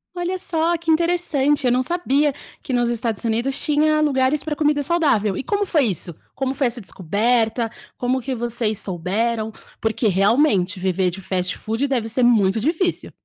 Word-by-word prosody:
Olha 355 +1 -2
só, 340 -2 0
que 330 0 -1
interessante. 315 -4 +1
Eu 250 - +3
não 250 +1 +2
sabia 295 -3 +1 0.3
que 265 - -4
nos 240 -1 +2
Estados 230 -2 -2
Unidos 235 +4 -1
tinha 305 0 +2
lugares 275 -1 +1
pra 305 -1 -3
comida 295 -1 +1
saudável. 265 - +1
E - - -3
como 410 +4 0
foi 310 -8 +2
isso? 175 -5 -2 0.2
Como 265 -1 -1
foi 275 -1 +1
essa 240 0 -2
descoberta? 225 +5 0 0.3
Como 255 +1 0
que 265 +2 -3
vocês 230 -2 -2
souberam? 215 +5 -1 0.3
Porque, 220 +1 0
realmente, 195 -1 +2
viver 185 0 +1
de 190 +3 -8
fast 180 -1 -2
food 225 +6 -2
deve 245 -5 -1
ser 245 +3 +1
muito 220 -4 +4
difícil. 335 - -1
245 Hz, 170 wpm, -21 LUFS, 215-300 Hz, 0.3 s, muito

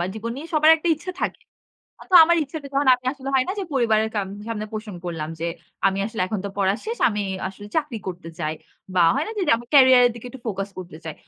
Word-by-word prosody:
বা - - 0
জীবন 225 +2 -5
নিয়ে 295 +4 -7
সবার 310 +1 +6
একটা 325 +2 -3
ইচ্ছা 345 +4 -7
থাকে। - - -2 0.6
আতো 370 - -3
আমার 340 +1 +3
ইচ্ছাটা 285 +1 -7
যখন 275 0 +2
আমি 250 0 -10
আসলে 275 -1 -8
হয় 260 - +4
না - - 0
যে, 395 - -2
পরিবারের 220 -4 +2
কাম 200 -2 -1 0.2
সামনে 215 -2 -3
পোষণ 215 -2 -6
করলাম 165 -3 -4
যে, 165 - -1 0.4
আমি 195 0 +1
আসলে 220 -2 -6
এখন 210 +2 -3
তো 200 - -2
পড়ার 195 +2 +2
শেষ। 460 +2 -3
আমি 210 -2 -2 0.3
আসলে 205 +2 -11
চাকরি 295 -8 -1
করতে 175 -2 -7
চাই। 155 +1 -2 0.4
বা 180 - +4
হয় 280 +4 0
না - - -5
যে, 405 - -1
যে, - - +6
আমি 235 - -9
career 260 -2 +8
এর - - +2
দিকে 235 +1 -10
একটু 265 - -11
focus 195 -2 -3
করতে 175 -3 -9
চাই। 160 -2 -5
230 Hz, 245 wpm, -23 LUFS, 195-280 Hz, 0.6 s, career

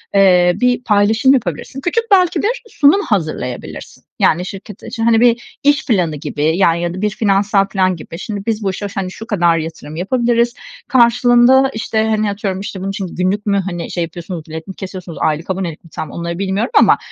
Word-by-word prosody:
eee, 180 -3 +5
bir 250 0 +2
paylaşım 220 +5 +3
yapabilirsin. 240 - -3
Küçük 355 +10 0
belki 365 -3 +4
bir 480 +3 -1
sunum 300 +5 +4
hazırlayabilirsin. 155 - -4 0.2
Yani, 175 +3 +2
şirket 195 +1 -9
için, 230 -1 -5
hani, 225 -1 +4
bir 240 0 +1
iş 290 +2 +3
planı 180 - +1
gibi, 145 0 -4
ya, 170 -4 +4
ya 170 0 -2
da 185 - -6
bir 210 - +1
finansal 200 -1 +1
filan 185 -2 +1
gibi. 165 +1 -9
"Şimdi, 205 -2 -5
biz 225 -1 -1
bu 195 - 0
işe 205 +2 -5
ş 200 - -14
hani, 185 -1 -3
şu 225 +4 -10
kadar 170 -6 +2
yatırım 160 -2 -6
yapabiliriz, 235 +5 +1 0.3
karşılığında, 245 +1 +4
işte, 220 0 -1
hani, 215 -1 +1
atıyorum, 200 -2 -3
işte" 195 -1 -6
Bunun 195 - -3
için 195 -1 -4
günlük 190 +3 -1
mü, 200 -1 +1
hani, 175 -2 -5
şey 175 - -1
yapıyorsunuz, 170 0 -7
bilet 160 0 -7
mi 190 - -7
kesiyorsunuz, 185 -3 -8
aylık 155 +3 -1
abonelik 185 -4 -3
mi 165 - -17
tam 155 - -6
onları 170 +1 -5
bilmiyorum. 195 - -1
Ama, - - +5
200 Hz, 195 wpm, -17 LUFS, 175-235 Hz, 0.3 s, eee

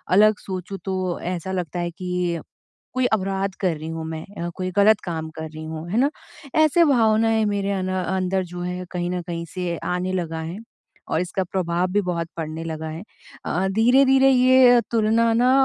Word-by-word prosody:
अलग 215 +1 +6
सोचूँ 190 0 -6
तो 185 -2 -2
ऐसा 180 +1 -3
लगता 180 -2 -3
है 175 0 -1
कि 180 -1 -2 0.6
कोई 255 -1 +2
अपराध 195 -1 0
कर 180 -5 +1
रही 155 +1 -7
हूँ 165 0 -4
मैं 160 0 -5 0.2
अ, - - -2
कोई 185 0 -2
ग़लत 210 +1 +5
काम 160 -3 -4
कर 160 0 -5
रही 155 0 -8
हूँ, 160 +1 -6
है 205 - -1
ना। 275 +3 +3 0.5
ऐसे 325 +3 +5
भावनाएँ 225 -5 +3
मेरे 200 -1 -1
अं 190 -1 -2 0.2
अंदर 190 0 0
जो 175 0 -8
है 180 +1 -4
कहीं 175 -1 -2
न 180 0 -2
कहीं 170 -1 -5
से 180 -2 -2
आने 180 +1 -1
लगा 165 -3 -2
है। 165 +4 -5 0.5
और - - 0
इसका 180 +1 -2
प्रभाव 175 -1 -1
भी 205 - +3
बहुत 170 -2 -2
पड़ने 160 0 -4
लगा 160 -1 -4
है। 160 +3 -6 0.4
अ, 185 +3 0
धीरे-धीरे 265 +5 +5
ये 255 -1 +6
तुलना 230 0 +3
ना 245 +2 +4
185 Hz, 190 wpm, -23 LUFS, 170-215 Hz, 0.6 s, अलग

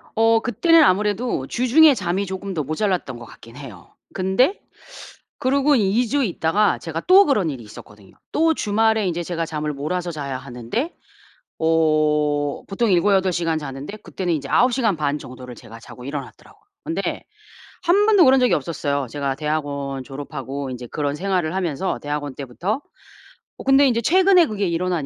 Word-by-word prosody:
어 225 0 +4
그때는 330 +7 +4
아무래도 210 - 0
주중에 270 - +5
잠이 195 -2 -2
쪼금 190 0 -5
더 155 - -1
모자랐던 155 - -2
것 120 - -10
같긴 115 +2 -15
해요. 140 0 -12 0.2
근데 195 - +1 0.8
그러고 280 +2 +2
2 225 +2 +2
주 280 +4 +1
있다가 200 +1 +1
제가 165 0 -5
또 385 +2 +7
그런 210 - +1
일이 130 -5 -6
있었거든요. 105 -2 -14 0.2
또 325 +1 +2
주말에 220 -3 +1
인제 175 -1 -2
제가 165 -1 -3
잠을 150 -2 -4
몰아서 175 +5 -3
자야 140 -4 -5
하는데 125 - -4 0.7
어 150 -2 +1
보통 210 +3 -1
7-8 190 +1 +3
시간 165 -2 -1
자는데 145 +6 -7
그때는 180 -4 -4
이제 140 -3 -4
9 250 +1 +3
시간 225 -7 +1
반 150 -1 -1
정도를 125 -1 -10
제가 115 0 -13
자고 125 +2 -12
일어났더라고요. 140 0 -9 0.2
근데 325 - -3 0.6
1 400 +5 +3
번도 405 -6 +6
그런 265 0 +5
적이 250 - +3
없었어요. 145 -2 -2
제가 140 -1 -2
대학원 145 -3 -3
졸업하고 140 -1 -6
인제 125 -1 -7
그런 145 +1 -2
생활을 180 -1 -1
하면서 180 -1 -2
대학원 145 -1 -4
때부터 170 - -4 0.8
어 - - -9
근데 270 +1 +5
인제 235 -2 +1
최근에 365 - +4
그게 205 -3 -2
일어난 170 -3 -1
175 Hz, 345 characters per minute, -21 LUFS, 145-225 Hz, 0.8 s, 또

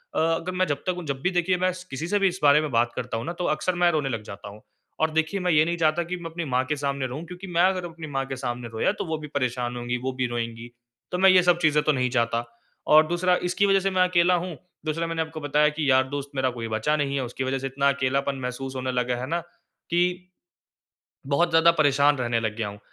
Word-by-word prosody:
अ, - - +1
अगर 165 +2 0
मैं 185 - +2
जब 145 -1 -3
तक 180 -1 -1
जब 135 -1 -3
भी 180 - +1
देखिए 180 +1 +1
मैं 185 +1 +1
स 180 0 -9
किसी 140 +5 -4
से 205 - +1
भी 195 - +4
इस 185 0 -3
बारे 145 +1 +7
में 155 - -3
बात 120 0 +2
करता 120 -2 -3
हूँ 115 - -5
ना 170 - -3
तो 180 - -1
अक़्सर 180 +4 -2
मैं 175 0 +4
रोने 150 -4 0
लग 115 -4 -3
जाता 100 -1 -9
हूँ। 105 +1 -13 0.4
और 160 0 +2
देखिए 160 +5 0
मैं 180 -1 +1
ये 155 -1 +5
नहीं 170 +1 -1
चाहता 165 +1 +2
कि 180 +2 -4
मैं 170 -1 -7
अपनी 170 0 -4
माँ 130 -2 +1
के 150 +3 -1
सामने 140 -1 -2
रोऊँ 135 +6 -6
क्योंकि 180 +3 -9
मैं 175 -1 +1
अगर 185 -1 +2
अपनी 165 -2 -8
माँ 135 -2 -2
के 135 - -5
सामने 125 -2 -4
रोया, 110 - +1
तो 205 - -5
वो 160 -1 -2
भी 150 -1 -8
परेशान 125 -4 -2
होंगी, 120 0 -2
वो 130 +2 -3
भी 130 - +1
रोएँगी, 115 0 -5 0.4
तो 180 - -1
मैं 190 +1 +6
ये 185 -1 +7
सब 175 -1 +4
चीज़ें 150 -2 +3
तो 155 - +3
नहीं 130 -3 0
चाहता। 115 -1 0 0.4
और 155 +1 +6
दूसरा 175 +2 +2
इसकी 180 +3 +1
वज़ह 195 -1 +4
से 195 +1 0
मैं 185 -1 +2
अकेला 180 0 +3
हूँ, 175 -2 -4 0.3
दूसरा 165 +2 -1
मैंने 165 0 -2
आपको 160 0 -5
बताया 150 +1 +3
कि 150 -1 -2
यार 130 0 +5
दोस्त 140 0 -5
मेरा 130 -1 +1
कोई 115 -2 -5
बचा 110 +7 0
नहीं 140 -2 -1
है, 135 - -1
उसकी 125 +2 -4
वज़ह 135 +1 -1
से 135 - -3
इतना 140 +1 +1
अकेलापन 140 0 0
महसूस 130 +1 -5
होने 130 0 -2
लगा 125 0 0
है 130 - -4
ना 170 +4 -1 0.5
कि 180 +1 0 1.0
बहुत 170 +5 +2
ज़्यादा 165 +1 +6
परेशान 145 0 +4
रहने 120 -2 0
लग 110 -1 -3
गया 110 -3 -2
हूँ। 100 - -9
150 Hz, 265 wpm, -25 LUFS, 130-175 Hz, 1.0 s, बारे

